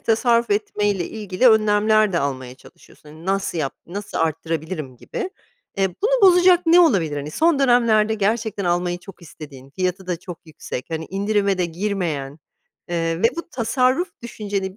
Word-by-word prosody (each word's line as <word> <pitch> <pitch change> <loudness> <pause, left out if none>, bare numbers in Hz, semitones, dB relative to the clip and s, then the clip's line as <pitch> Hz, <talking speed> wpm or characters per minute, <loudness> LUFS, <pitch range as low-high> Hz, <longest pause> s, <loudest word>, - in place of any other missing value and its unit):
tasarruf 235 +1 +2
etmeyle 205 -2 0
ilgili 210 +3 +1
önlemler 215 -1 +3
de 170 - +1
almaya 130 -4 -3
çalışıyorsun. 150 - -19
Hani, 160 +3 -13
nasıl 195 -3 -1
yap 140 -4 -2
nasıl 200 +4 -6
arttırabilirim 160 -3 -3
gibi. 385 - -5 0.5
Eee, 195 -1 +2
bunu - - +2
bozacak 360 0 +4
ne 340 +2 +7
olabilir? 190 - +2
Hani, 145 +1 -5
son 320 - +2
dönemlerde 235 -5 +3
gerçekten 215 -1 -1
almayı 175 0 0
çok 190 0 -14
istediğin, 140 -4 -12
fiyatı 185 +3 -3
da 180 - -1
çok 175 -1 -9
yüksek, 150 -5 -7
hani, 160 0 -3
indirime 200 0 0
de 180 - +1
girmeyen, 165 -6 -3 0.5
eee, 165 -1 -1
ve 230 - +7
bu 340 0 -6
tasarruf 255 - +1
düşünceni 200 -4 -4
195 Hz, 155 wpm, -21 LUFS, 165-220 Hz, 0.5 s, ne